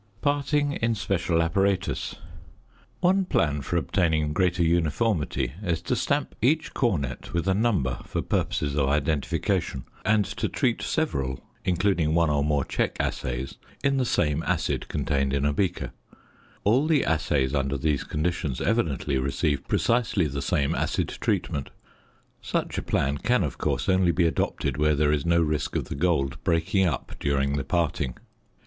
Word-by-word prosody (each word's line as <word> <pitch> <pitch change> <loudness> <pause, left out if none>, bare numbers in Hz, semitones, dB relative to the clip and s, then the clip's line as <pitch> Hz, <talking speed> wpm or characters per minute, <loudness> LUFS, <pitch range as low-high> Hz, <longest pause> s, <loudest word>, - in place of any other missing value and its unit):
~Parting 145 +1 +1
in 115 0 +2
special 85 -5 +1
apparatus.~ 95 +3 0 0.9
One 190 +2 +4
plan 75 - +1
for 85 +5 -1
obtaining 80 -4 +1
greater 90 0 +2
uniformity 80 - +1
is 85 -5 -1
to - - 0
stamp - - 0
each 150 +7 +2
cornet 70 - -1
with 85 +2 0
a 95 - +4
number 95 - +1
for - - -3
purposes 70 0 -1
of 70 -2 +2
identification, 70 -3 0 0.2
and 105 -1 +3
to 105 +2 -3
treat 125 -5 0
several, 65 - -1 0.2
including 90 -3 +1
one 85 -2 +3
or 70 -1 +2
more 75 -2 +1
check - - -1
assays 65 +2 -3 0.3
in 140 -1 +2
the 130 - +1
same 75 -8 +1
acid - - -1
contained 70 -1 0
in 70 0 +1
a 75 - +2
beaker; 85 -7 -1 0.7
all 125 +9 +3
the 155 -4 +3
assays 70 -4 +1
under 70 0 0
these 70 0 0
conditions 75 -4 -2
evidently 75 - 0
receive 70 +2 -1
precisely 115 -6 +2
the 70 -1 -3
same 70 0 +1
acid - - -1
treatment. 70 -2 -1 0.7
Such - - -2
a - - -3
plan 70 +2 0
can 125 -3 +2
of 70 -6 -4
course - - -1
only 95 -2 +4
be 85 0 +2
adopted 70 -4 -1
where 75 0 +3
there 75 0 +2
is 75 +1 0
no 85 0 +4
risk 75 -2 -1
of - - -2
the - - -3
gold 70 -4 0
breaking 90 +3 +2
up 70 -7 -3
during 70 0 +1
the 70 - -1
parting. 75 -4 -1
80 Hz, 155 wpm, -26 LUFS, 70-100 Hz, 0.9 s, One